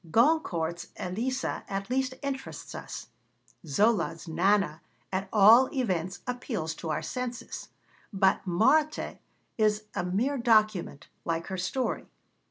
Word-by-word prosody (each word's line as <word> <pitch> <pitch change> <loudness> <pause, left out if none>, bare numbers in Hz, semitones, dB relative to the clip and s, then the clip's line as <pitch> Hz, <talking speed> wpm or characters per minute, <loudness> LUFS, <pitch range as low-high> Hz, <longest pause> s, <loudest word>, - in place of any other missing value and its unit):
Goncourt's 170 - +2
Elisa 240 +9 -2
at 195 +3 -3
least 260 0 0
interests 270 -1 -5
us; - - -7 0.6
Zola's 170 0 +1
Nana 175 -1 +2 0.3
at 190 +1 -1
all 225 +5 +7
events 185 -8 -1
appeals 240 - -3
to 165 - -5
our 155 - -1
senses. 250 -1 -5 0.4
But 195 -2 +3
Marthe 295 - +2 0.4
is 215 0 +3
a 175 - -1
mere 230 +10 0
document, 215 - +2 0.2
like 165 -1 -1
her 190 - -3
story. 245 +8 -2
210 Hz, 115 wpm, -29 LUFS, 180-250 Hz, 0.6 s, all